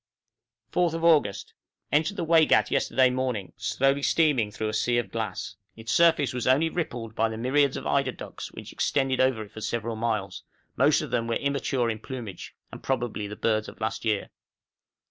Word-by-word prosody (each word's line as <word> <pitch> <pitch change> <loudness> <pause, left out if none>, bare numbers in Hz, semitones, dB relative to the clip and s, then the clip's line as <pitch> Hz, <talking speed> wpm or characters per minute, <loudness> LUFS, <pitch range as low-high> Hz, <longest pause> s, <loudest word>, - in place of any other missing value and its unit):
4th 175 -2 +2
August. 150 -12 +2 0.4
Entered 155 +7 +1
the 175 - -1
Waigat 160 -1 +4
yesterday 130 -1 +3
morning, 125 -7 -2
slowly 135 +7 +1
steaming 140 -8 +2
through 110 +1 -3
a - - -4
sea 120 +2 +1
of 120 - -2
glass. 100 -5 -4 0.2
Its 110 0 -6
surface 165 -4 +4
was 125 -1 -3
only 145 +6 +4
rippled 120 -10 -4
by 115 0 +1
the 110 - -5
myriads 135 +3 +2
of - - -7
eider 140 -2 +1
ducks - - -9
which - - -10
extended 135 -2 0
over 130 -4 +2
it 105 - -14
for 110 - -9
several 115 0 -2
miles: 110 -4 -2 0.3
most - - +4
of - - -7
them 115 - 0
were 115 - 0
immature 140 -3 0
in 110 -1 -2
plumage, 115 -6 -8 0.2
and - - -9
were - - -18
probably 120 -5 -2
the 105 - -7
birds 110 -1 0
of - - -14
last 110 0 -3
year. 110 -3 -1
120 Hz, 185 wpm, -26 LUFS, 110-140 Hz, 0.4 s, Waigat